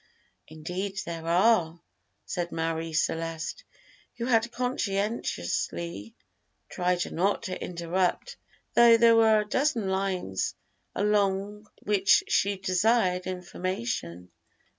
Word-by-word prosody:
"Indeed 180 +6 -5
there 165 -1 -6
are," 175 -2 +3 0.5
said 175 -1 -3
Marie 165 0 -2
Celeste, 165 +1 -2 0.5
who 235 - -3
had 235 -1 +2
conscientiously 195 - -2 0.5
tried 180 -1 -1
not 195 +4 0
to 185 -1 -5
interrupt, 180 - -2 0.4
though 235 -1 +7
there 230 0 +6
were 220 -1 +5
a - - -5
dozen 250 -5 0
lines 190 - -2 0.4
along 205 0 0
which 200 -1 +3
she 200 0 +1
desired 185 0 +1
information. 175 - -4
185 Hz, 95 wpm, -27 LUFS, 165-210 Hz, 0.5 s, though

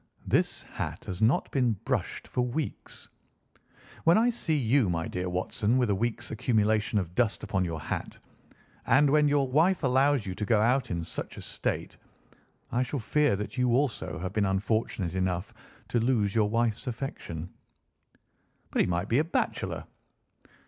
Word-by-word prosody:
"This - - +1
hat - - -6
has 90 +1 -5
not 110 +5 +2
been 125 -4 +2
brushed 95 - -3
for 125 - -1
weeks. 125 +5 -4 1.0
When 165 +4 +6
I 235 +2 +4
see 165 -9 0
you, 125 -4 +3
my 85 -1 -1
dear 90 0 -3
Watson, 105 +6 0
with 125 -5 +2
a - - +2
week's 120 +3 -2
accumulation 110 -2 +1
of 90 -4 -2
dust 115 0 +1
upon 95 -2 0
your 80 -2 -3
hat, - - -4 0.7
and 145 +2 +5
when 150 0 +5
your 145 -2 +2
wife 165 +7 +3
allows 135 -1 +3
you 95 - -3
to 105 - -5
go 110 +1 +3
out 125 +5 +2
in 85 -2 -2
such - - -6
a - - -7
state, - - -3 0.7
I 120 - +1
shall 130 +3 -2
fear 145 +1 +2
that 105 +6 -5
you 125 -1 +3
also 135 -3 -1
have 95 +2 -4
been 105 -2 +2
unfortunate 95 -2 -1
enough 95 -1 -1 0.4
to 120 - +1
lose 110 -4 +1
your 110 -2 +2
wife's 115 +1 0
affection." 90 - -5 1.2
"But - - +2
he - - +2
might 90 +1 -1
be 120 +5 +3
a - - +3
bachelor." 165 - -2
115 Hz, 170 wpm, -28 LUFS, 95-130 Hz, 1.2 s, When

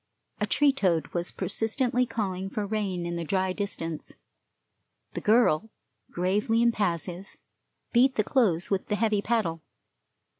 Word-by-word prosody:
A - - 0
tree 290 -2 +3
toad 170 - +1
was 175 0 -1
persistently 235 +6 0
calling 195 -4 -3
for 210 +1 -3
rain 200 -4 -2
in 170 0 -3
the 170 - -3
dry 185 +2 0
distance. 165 -6 -4 1.0
The - - -4
girl, 220 -3 +3 0.4
gravely 205 +6 +1
impassive, 190 -4 0 0.7
beat 255 +2 +4
the 215 - +2
clothes 200 - +1
with 195 -1 0
the 210 - 0
heavy 215 -1 +1
paddle. 205 -8 -1
200 Hz, 135 wpm, -27 LUFS, 175-225 Hz, 1.0 s, beat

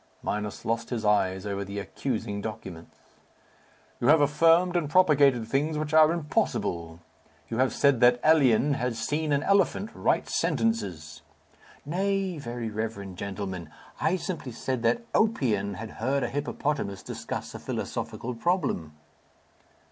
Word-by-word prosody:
Minos 105 -1 -3
lost 115 +1 -1
his 115 -3 -3
eyes 95 -2 +2
over 100 -1 -2
the 100 +1 -7
accusing 105 -1 -3
documents. 95 -6 -8 1.0
"You 120 - 0
have 155 +3 +7
affirmed 165 +5 +4
and 165 -5 0
propagated 140 -9 +4
things 150 +5 0
which 150 0 -3
are 155 0 +7
impossible. 85 - -2 0.5
You 115 - -3
have 130 0 +3
said 140 -4 +3
that 125 0 +5
Elien 145 -3 +4
had 125 -3 -1
seen 150 +7 -1
an 140 +1 +2
elephant 200 +3 +2
write - - 0
sentences." 90 - -1 0.6
"Nay, 190 +1 -1
very 120 -3 -5
reverend 105 -4 -5
gentleman! 95 -4 -5 0.3
I 175 - +2
simply 170 -8 -5
said 130 +1 -3
that 120 - +1
Oppian 115 - +1
had 110 +3 -7
heard 135 +4 -1
a 120 - -1
hippopotamus 140 -7 -2
discuss - - -6
a - - -7
philosophical 125 +2 -4
problem." 130 - -1
125 Hz, 135 wpm, -27 LUFS, 105-155 Hz, 1.0 s, have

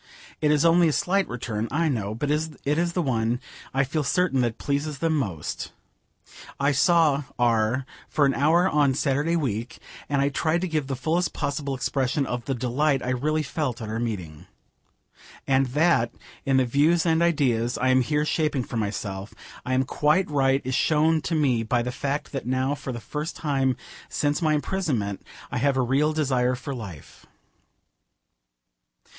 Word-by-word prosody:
It 150 - +3
is 150 +1 +3
only 170 +1 +5
a 155 - +1
slight 195 +5 +1
return, 115 -2 -3
I 160 +4 +1
know, 110 -7 -2
but 145 +5 -2
it 155 0 -1 0.2
is 170 0 0
the 180 - +1
one, 120 -3 0 0.3
I 135 +1 +2
feel 145 +3 -1
certain, 145 -2 +1
that 120 -2 -1
pleases 145 +1 -2
them 160 +2 +1
most. 95 - -3 0.9
I 140 +1 +3
saw 150 -1 +3
R 120 +1 +2 0.2
for 145 - +2
an 135 - +2
hour 160 +8 +3
on 145 -6 +2
Saturday 145 +4 +1
week, 120 -7 -2 0.3
and 140 -1 +1
I 140 +1 +2
tried 160 +4 0
to 185 - -1
give 155 -5 -1
the 135 - -2
fullest 165 +7 0
possible 140 -1 -2
expression 135 +2 0
of 125 -2 -4
the 135 - -1
delight 135 +4 +1
I 125 - -1
really 155 +5 0
felt 140 -3 -3
at 110 - -6
our 110 +1 -2
meeting. 90 -10 -5 1.0
And 135 0 +2
that, 145 -3 +2 0.4
in 135 -1 +3
the 130 - +3
views 150 +7 +3
and 165 -1 +3
ideas 125 -8 +1
I 130 - +1
am 130 0 +5
here 150 +4 0
shaping 150 -4 0
for 120 - -5
myself, 100 -2 -4 0.3
I 130 - +1
am 130 - +3
quite 150 +7 +2
right 135 -1 +2
is 130 - -2
shown 155 +3 +3
to 165 - -2
me 135 -7 +2
by 120 +2 0
the 125 - -3
fact 140 +3 -3
that 135 -4 -5
now 130 +2 +1
for 140 -2 -5
the 120 - -5
first 150 +8 -5
time 135 -4 0 0.3
since 145 +3 0
my 155 -2 +3
imprisonment 140 - -2 0.3
I - - -1
have 135 +1 +2
a - - +3
real 140 +5 +2
desire 130 -5 +1
for 135 +3 -6
life. 100 - -10
140 Hz, 180 wpm, -25 LUFS, 125-155 Hz, 1.0 s, only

